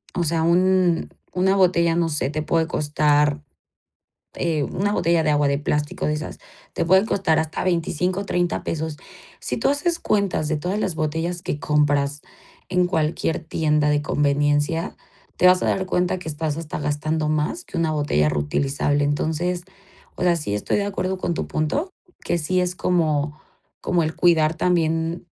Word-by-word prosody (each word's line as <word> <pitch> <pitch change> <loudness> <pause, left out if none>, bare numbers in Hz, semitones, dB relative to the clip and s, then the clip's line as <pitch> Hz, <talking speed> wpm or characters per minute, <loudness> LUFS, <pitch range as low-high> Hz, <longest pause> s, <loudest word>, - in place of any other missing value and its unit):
o 175 - +1
sea 165 0 0
un 180 0 +3 0.2
una 190 +2 +2
botella 170 -3 +3
no 170 -1 +1
sé 150 -4 -1
te 155 +1 -3
puede 165 +1 +1
costar 150 -2 +1 0.9
eh, 160 -4 -1
una 205 +7 -1
botella 170 -4 +2
de 155 - +1
agua 145 -1 +2
de 140 0 +1
plástico 150 0 -2
de 150 - +1
esas, 150 +1 -6 0.4
te - - 0
pueden 190 +4 +4
costar 185 -7 +1
hasta 160 0 -2
25, 180 +2 0
30 175 -2 0
pesos. 160 -1 -3 0.4
Si - - -3
tú - - +1
haces 335 +4 0
cuentas 200 - 0
de 155 - 0
todas 180 +7 -2
las 190 -5 -1
botellas 160 +3 -2
que 150 - -3
compras 145 -1 +1 0.5
en 180 -1 +2
cualquier 160 -2 -1
tienda 150 -2 +1
de 145 0 +1
conveniencia, 145 +3 0 0.4
te 180 - +5
vas 180 0 +5
a - - 0
dar 190 -1 0
cuenta 180 0 0
que 180 - -8
estás 150 -1 -2
hasta 165 -2 -5
gastando 150 +1 -1
más 155 - -1
que - - -9
una 165 -1 +1
botella 145 - +1
reutilizable. 140 - 0
Entonces, 160 +5 -1 0.5
o - - -6
sea, 175 -1 +3
sí 150 -11 -3
estoy 105 - -1
de 200 - 0
acuerdo 190 -2 -2
con 175 - -1
tu - - -3
punto, 175 - -1 0.3
que - - 0
sí 180 +4 0
es 180 0 -1
como 155 -4 0 0.4
como 175 -2 +1
el 160 0 -2
cuidar 160 -2 +3
también 165 -1 0
160 Hz, 170 wpm, -22 LUFS, 150-180 Hz, 0.9 s, te